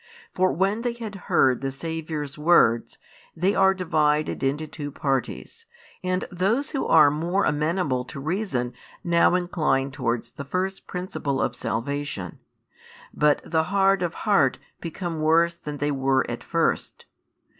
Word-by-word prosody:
For 185 0 +2
when 195 +5 0
they 240 0 -1
had 230 -3 -7 0.2
heard 130 -2 +3
the 135 - -1
Saviour's 155 -1 -4
words, 150 -7 +3 0.4
they 185 +5 +1
are 190 0 +4
divided 155 -4 +1
into 140 +3 0
two 150 -1 -6
parties, 140 - -3 0.4
and 185 0 -1
those 200 +10 0
who 275 - -2
are 150 -3 +6
more 170 +6 0
amenable 150 -3 0
to 140 - -8
reason 145 - -2 0.3
now 170 0 +4
incline 155 -7 0
towards 125 -4 -2
the 140 - -7
first 185 +6 -3
principle 175 -7 -3
of 125 - 0
salvation, 125 -6 -4 0.7
but 150 -1 +3
the 160 -1 +1
hard 195 0 +3
of 175 -1 -2
heart 175 - +3 0.2
become 165 -1 -4
worse 165 +2 +3
than 150 -3 -7
they 145 +1 0
were 135 -1 +1
at - - -5
first. - - -1
160 Hz, 145 wpm, -25 LUFS, 140-185 Hz, 0.7 s, are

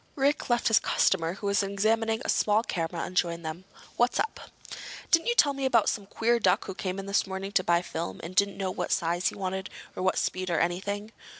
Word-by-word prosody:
Rick 285 +1 +1
left 240 0 +2
his 225 - +5
customer 165 -3 +1
who 205 - -8
was 200 0 +2
examining 220 +4 0
a - - -2
small 215 +1 +2
camera 165 -5 -3
and 185 - -9
joined 170 -2 0
them. 165 +4 -6 0.3
"What's 240 +1 +2
up?" 450 - -1 0.7
"Didn't 330 +4 +4
you 475 - +2
tell 290 -10 +5
me 275 0 -5
about 245 -5 +3
some 205 -3 -4
queer 235 +3 +1
duck 185 -4 +2
who 190 - -5
came 185 0 -4
in 195 - -5
this 200 0 +1
morning 190 +1 -5
to 195 -3 +2
buy 170 -1 +2
film 170 -1 -5
and 170 +3 -6
didn't 200 0 +2
know 190 -2 -2
what 180 - -3
size 175 +2 +1
he - - -2
wanted 190 0 -3 0.3
or - - -4
what 185 0 +1
speed 185 0 -1
or 170 - +1
anything?" 200 +5 -2
195 Hz, 225 wpm, -28 LUFS, 180-225 Hz, 0.7 s, his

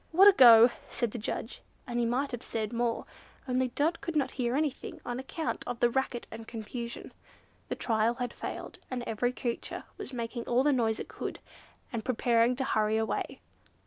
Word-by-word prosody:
"What 375 +5 +8
a - - +11
go!" 240 - +9 0.2
said 235 -3 -1
the 240 - -5
judge; 220 +3 -4 0.2
and 240 -1 -2
he 235 - +2
might 265 +4 0
have 245 -1 -4
said 220 -2 -3
more, 235 -1 0 0.4
only 255 0 +1
Dot 300 +7 0
could 335 - -4
not 285 -3 +1
hear 245 -1 -1
anything 290 -2 -2
on 245 +1 -3
account 315 +4 -3
of 240 - -3
the 240 - +4
racket 260 -2 -1
and 225 0 -8
confusion. 235 +1 -6 0.6
The - - -1
trial 225 0 +1
had 245 -1 -3
failed, - - -6
and 250 -2 -3
every 240 +2 0
creature 245 -2 -4 0.2
was 405 - -5
making 235 -1 -4
all 245 +2 +3
the 295 0 +4
noise 225 -4 +1
it - - -5
could, - - -5 0.6
and 225 -2 -2
preparing 240 0 +3
to 265 - 0
hurry 215 -3 +1
away. 220 0 -2
240 Hz, 190 wpm, -30 LUFS, 230-260 Hz, 0.6 s, a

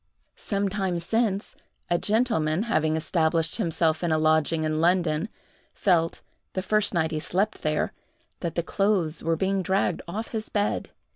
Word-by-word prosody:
Some 200 -1 -1
time 190 -3 -1
since, 205 +2 -1 0.3
a 175 - +1
gentleman 210 -7 +1
having 155 -9 +1
established 160 0 +1
himself 165 -5 +1
in 170 - +1
a 155 - +3
lodging 155 +1 +2
in 155 0 0
London, 175 +1 +2 0.5
felt, 165 -4 +1 0.3
the 185 - -2
first 215 +1 +2
night 160 -3 0
he 155 - -1
slept 195 +7 -1
there, 155 0 0 0.5
that 170 - -4
the 170 - 0
clothes 190 -4 0
were 165 0 +1
being 195 +2 +1
dragged 190 -1 0
off 215 +6 -4
his 220 -2 -4
bed. 205 0 -1
175 Hz, 155 wpm, -26 LUFS, 160-200 Hz, 0.5 s, a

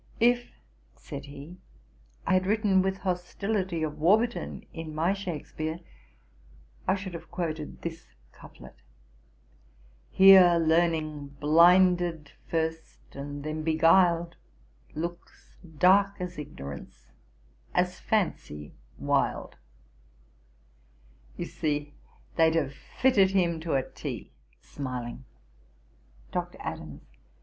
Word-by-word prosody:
'If 240 +1 +2 0.4
(said 140 0 -8
he) 145 +5 -11 0.7
I - - +2
had 185 0 +2
written 205 -2 +3
with 190 0 -1
hostility 185 -1 -2
of 150 -1 -4
Warburton 220 +9 +1
in 160 -2 -7
my 165 +5 +2
Shakspeare, 160 -4 -5 1.1
I 190 - +3
should 190 -2 -6
have 170 - -9
quoted 160 -3 -5
this 165 -1 -6 0.2
couplet: - - -14 1.3
"Here 190 -2 +8
Learning, 155 -3 0
blinded 170 0 +4 0.2
first 160 0 -4
and 145 +1 -6
then 155 +1 -4
beguil'd, 170 +1 +3 0.6
Looks 170 +3 -7 0.2
dark 195 +4 +5
as 180 -2 -5
Ignorance, 70 - -9 0.6
as 180 0 +1
Fancy 115 - -2 0.2
wild." - - -1 1.8
You - - -3
see 145 -1 -3 0.4
they'd 160 -1 +4
have 140 -4 0
fitted 200 - +2
him 175 -4 +1
to 160 -2 -2
a 135 - 0
T,' - - -7 0.3
(smiling.) 130 -2 -6 1.1
DR. - - -2
ADAMS. 75 -2 -7
165 Hz, 100 wpm, -28 LUFS, 150-185 Hz, 1.8 s, Here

